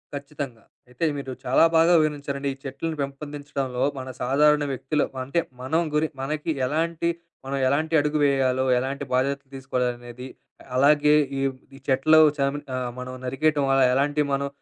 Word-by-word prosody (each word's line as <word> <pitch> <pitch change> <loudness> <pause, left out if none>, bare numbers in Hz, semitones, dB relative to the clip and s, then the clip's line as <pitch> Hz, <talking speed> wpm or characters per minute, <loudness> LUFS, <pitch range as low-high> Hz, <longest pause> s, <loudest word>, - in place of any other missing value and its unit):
ఖచ్చితంగా. 140 -5 -7 0.3
అయితే 125 +7 -2
మీరు 135 -2 -5
చాలా 125 - +4
బాగా 165 +2 +5
వివరించారండి. 140 -2 -2
ఈ 135 - -16
చెట్లను 155 +4 -4
పెంపొందించడంలో 140 -2 -4 0.2
మన 130 0 -7
సాధారణ 150 +4 +3
వ్యక్తులు 135 +3 -1 0.2
అంటే, 140 +6 0 0.2
మనం 160 +6 +1
గురి 155 +1 +2
మనకి 150 +3 -2
ఎలాంటి 165 +4 -1 0.4
మనం 135 +1 -2
ఎలాంటి 155 +4 0
అడుగు 150 +1 0
వేయాలో, 130 -2 +2 0.2
ఎలాంటి 135 +2 -3
బాధ్యతలు 135 +1 0
తీసుకోవాలనేది 125 -1 -4 0.5
అలాగే 145 +2 +5 0.2
ఈ - - -1 0.4
ఈ - - -12
చెట్లు 140 +4 +5 0.2
చనిమి 140 +1 0
ఆహ్, 125 -1 -2
మనం 125 0 -6
నరికేయటం 145 +2 +1
అలా 135 -1 +4
ఎలాంటి 145 +2 +1
మనం 140 0 0
140 Hz, 145 wpm, -24 LUFS, 130-150 Hz, 0.5 s, బాగా